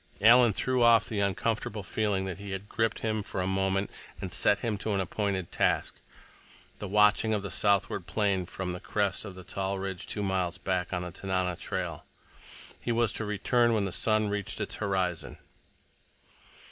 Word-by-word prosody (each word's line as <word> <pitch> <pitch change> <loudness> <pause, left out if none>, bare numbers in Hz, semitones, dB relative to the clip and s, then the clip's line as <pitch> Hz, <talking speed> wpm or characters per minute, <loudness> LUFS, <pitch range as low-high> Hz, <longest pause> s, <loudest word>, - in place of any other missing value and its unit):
Alan 120 +2 +7
threw 130 +5 +1
off 115 -2 +6
the 110 - -3
uncomfortable 105 +1 -1
feeling 100 0 -1
that 95 -1 -5
had 100 0 -6
gripped 115 0 -1
him 110 -1 0
for 100 - -5
a 90 - 0
moment, 95 +1 0 0.3
and 95 -2 -5
set 105 - +3
him 115 -3 -1
to 110 - -2
an 100 - +1
appointed 95 -1 -2
task—the 105 - -4
watching 105 +2 +4
of 100 - -2
the 100 - -5
southward 100 -3 +1
plain 100 -4 0
from 90 -1 -4
the 90 - -6
crest 100 +2 -1
of 95 -3 -8
a 95 - -9
tall 95 +2 -3
ridge 95 -2 -5
two 105 - -3
miles 90 -3 0
back 90 0 -2
on 90 -1 -2
the 90 - -6
Tanana 95 -1 -1
trail. - - -4 0.8
He 120 - -2
was 115 -1 +2
to 110 - -3
return 115 +3 +2
when 105 -2 +1
the 95 - -3
sun 110 +3 +2
reached 100 -1 -3
its - - -3
horizon. 95 -4 -1
100 Hz, 175 wpm, -29 LUFS, 95-110 Hz, 0.8 s, Alan